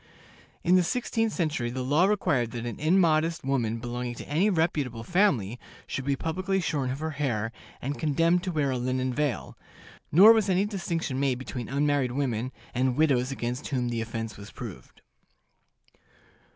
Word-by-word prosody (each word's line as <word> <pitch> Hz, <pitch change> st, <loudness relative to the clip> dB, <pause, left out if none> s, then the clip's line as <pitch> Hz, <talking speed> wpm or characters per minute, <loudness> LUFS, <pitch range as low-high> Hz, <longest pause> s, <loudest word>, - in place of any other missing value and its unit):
In 180 Hz, +2 st, +5 dB
the 180 Hz, -, +4 dB
sixteenth 225 Hz, +2 st, 0 dB
century 155 Hz, -10 st, -1 dB
the 130 Hz, +1 st, -3 dB
law 145 Hz, +7 st, +3 dB
required 145 Hz, -, +1 dB
that 120 Hz, -1 st, -4 dB
an 120 Hz, -, -5 dB
immodest 165 Hz, -1 st, +2 dB
woman 120 Hz, -5 st, 0 dB
belonging 120 Hz, +1 st, -4 dB
to -, -, -9 dB
any 170 Hz, +8 st, +2 dB
reputable 150 Hz, -, 0 dB
family 125 Hz, -, +1 dB, 0.3 s
should 135 Hz, -, -4 dB
be 140 Hz, 0 st, +1 dB
publicly 185 Hz, +6 st, -1 dB
shorn 145 Hz, -7 st, -1 dB
of 130 Hz, -, -2 dB
her 160 Hz, 0 st, -2 dB
hair, 115 Hz, -5 st, 0 dB, 0.3 s
and 140 Hz, +3 st, -3 dB
condemned 165 Hz, +3 st, +2 dB
to 185 Hz, -, -1 dB
wear 150 Hz, -4 st, 0 dB
a 130 Hz, -, -1 dB
linen 130 Hz, +1 st, -1 dB
veil; 145 Hz, -2 st, -2 dB, 0.6 s
nor 200 Hz, +8 st, +9 dB
was 220 Hz, -3 st, +1 dB
any 190 Hz, +2 st, +3 dB
distinction 170 Hz, -9 st, -2 dB
made 135 Hz, -3 st, +1 dB
between 125 Hz, -2 st, -6 dB
unmarried 140 Hz, -2 st, +1 dB
women 130 Hz, -3 st, -1 dB, 0.2 s
and 130 Hz, 0 st, +1 dB
widows 135 Hz, -4 st, +2 dB
against 125 Hz, 0 st, -3 dB
whom 125 Hz, -3 st, -1 dB
the 115 Hz, -1 st, -2 dB
offense 115 Hz, -1 st, -5 dB
was 100 Hz, +1 st, -10 dB
proved. -, -, -10 dB
140 Hz, 165 wpm, -27 LUFS, 125-165 Hz, 0.6 s, nor